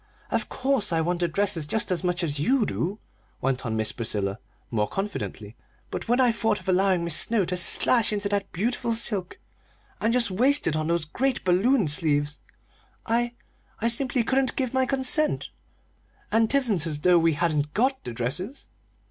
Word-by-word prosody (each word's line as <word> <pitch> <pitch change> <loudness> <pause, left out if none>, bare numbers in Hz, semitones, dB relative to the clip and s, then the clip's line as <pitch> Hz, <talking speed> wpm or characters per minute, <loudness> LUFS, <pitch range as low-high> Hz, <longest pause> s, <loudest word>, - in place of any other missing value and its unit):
"Of - - -1
course 265 -6 0
I 165 - +1
want 175 +2 -1
the 175 - +1
dresses 170 -2 0
just 210 +4 0
as 180 0 -1
much 180 0 0
as 145 -3 -1
you 250 - +2
do," 190 +3 -3 0.4
went 130 -1 -1
on 110 - -2
Miss 110 0 0
Priscilla, 105 -4 -2 0.3
more 105 -3 0
confidently; 200 +1 -5 0.4
"but - - -5
when 245 +2 +2
I 250 -2 +4
thought 225 -2 0
of - - -16
allowing 185 -1 +2
Mis' 170 -2 +3
Snow 220 0 +3
to 180 - -2
slash 220 +6 +3
into 205 -1 -1
that 200 -1 -2
beautiful 235 +5 -1
silk 205 -5 0 0.6
and 225 - +1
just 235 -4 +2
waste 260 +9 +3
it 155 - +1
on 155 0 -1
those 170 -1 0
great 255 - -1
balloon 195 - +2
sleeves, 145 -1 0 0.7
I 240 +1 0 0.4
I 230 - +1
simply 245 0 +2
couldn't 260 +2 0
give 260 -2 -2
my 260 0 +1
consent! 275 +4 +1 0.8
and 225 +1 +3
'tisn't 225 - +1
as 150 -2 -4
though 180 0 +5
we 165 0 +2
hadn't 150 -2 -1
got 260 +4 +1
the 120 - -5
dresses!" 135 - -4
195 Hz, 180 wpm, -25 LUFS, 160-240 Hz, 0.8 s, though